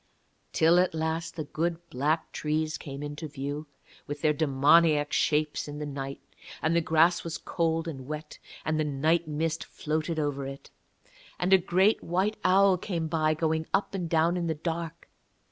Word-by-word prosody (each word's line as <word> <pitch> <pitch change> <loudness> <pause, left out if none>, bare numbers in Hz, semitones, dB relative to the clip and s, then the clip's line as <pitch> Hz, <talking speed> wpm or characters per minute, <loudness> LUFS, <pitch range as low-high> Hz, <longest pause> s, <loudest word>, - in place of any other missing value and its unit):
Till 165 +2 +4
at 180 -2 +1
last 160 +1 -2
the 155 - -3
good 165 +3 -2
black 150 +5 0
trees 155 +1 -1
came 140 -1 -7
into 145 +2 -5
view, 145 +1 -5 0.4
with 145 0 -5
their 155 -1 +3
demoniac 150 +1 +4
shapes 150 -1 +1
in 145 0 -6
the 150 - -4
night, 135 -1 -5 0.4
and 160 +1 +1
the 170 - +4
grass 165 +1 +3
was 165 -1 -4
cold 165 -1 -1
and 135 -5 -6
wet, 150 +1 -7 0.3
and 155 0 0
the - - +2
night 155 +3 +1
mist 160 +1 -1
floated 155 +2 -3
over 145 -3 -1
it. 135 0 -9 0.7
And 180 +2 +2
a 190 - +8
great 190 +4 +2
white 190 +5 0
owl 190 0 +5
came 170 -4 -2
by, 155 -1 +1
going 160 0 0
up 200 - -1
and 180 -4 -3
down 165 +2 +2
in 170 -1 -1
the 160 - 0
dark. 165 +1 -4
160 Hz, 175 wpm, -28 LUFS, 150-170 Hz, 0.7 s, a